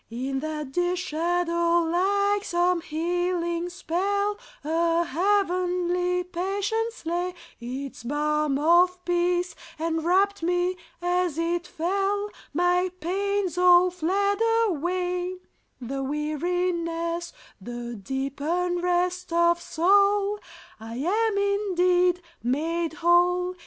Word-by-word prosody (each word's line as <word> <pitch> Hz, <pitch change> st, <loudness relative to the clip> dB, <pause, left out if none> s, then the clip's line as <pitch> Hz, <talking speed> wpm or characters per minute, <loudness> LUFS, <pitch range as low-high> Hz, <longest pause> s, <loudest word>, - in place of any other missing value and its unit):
In 260 Hz, +4 st, -3 dB
that 300 Hz, -2 st, -4 dB
dear 355 Hz, +4 st, +1 dB
shadow, 340 Hz, 0 st, +1 dB
like 400 Hz, +4 st, +1 dB
some 350 Hz, -1 st, +1 dB
healing 345 Hz, +1 st, -1 dB
spell, 400 Hz, +4 st, -1 dB, 0.3 s
A 335 Hz, +2 st, +1 dB
heavenly 360 Hz, 0 st, +1 dB
patience 400 Hz, +5 st, -2 dB
lay; 350 Hz, +2 st, -2 dB, 0.2 s
Its 255 Hz, +3 st, -6 dB
balm 300 Hz, +2 st, 0 dB
of 355 Hz, +4 st, +3 dB
peace 355 Hz, 0 st, +1 dB, 0.2 s
enwrapped 340 Hz, +5 st, +1 dB
me 355 Hz, +2 st, +1 dB, 0.3 s
as 355 Hz, -3 st, 0 dB
it 340 Hz, +1 st, -1 dB
fell; 395 Hz, +4 st, -1 dB, 0.2 s
My 355 Hz, +3 st, +2 dB
pains 385 Hz, +1 st, -1 dB
all 360 Hz, 0 st, +6 dB
fled 390 Hz, +4 st, 0 dB, 0.3 s
away, 360 Hz, 0 st, -1 dB, 0.4 s
The 270 Hz, +2 st, -4 dB
weariness, 335 Hz, +3 st, -2 dB, 0.3 s
the 240 Hz, +3 st, -6 dB
deep 265 Hz, +7 st, -4 dB
unrest 355 Hz, +2 st, 0 dB
of 340 Hz, 0 st, +3 dB
soul; 400 Hz, +4 st, +3 dB, 0.4 s
I 225 Hz, +1 st, -8 dB
am 405 Hz, -, +1 dB
indeed 365 Hz, -3 st, +2 dB, 0.2 s
"made 320 Hz, +6 st, -1 dB
whole." 355 Hz, +1 st, +3 dB
350 Hz, 95 wpm, -26 LUFS, 330-365 Hz, 0.4 s, all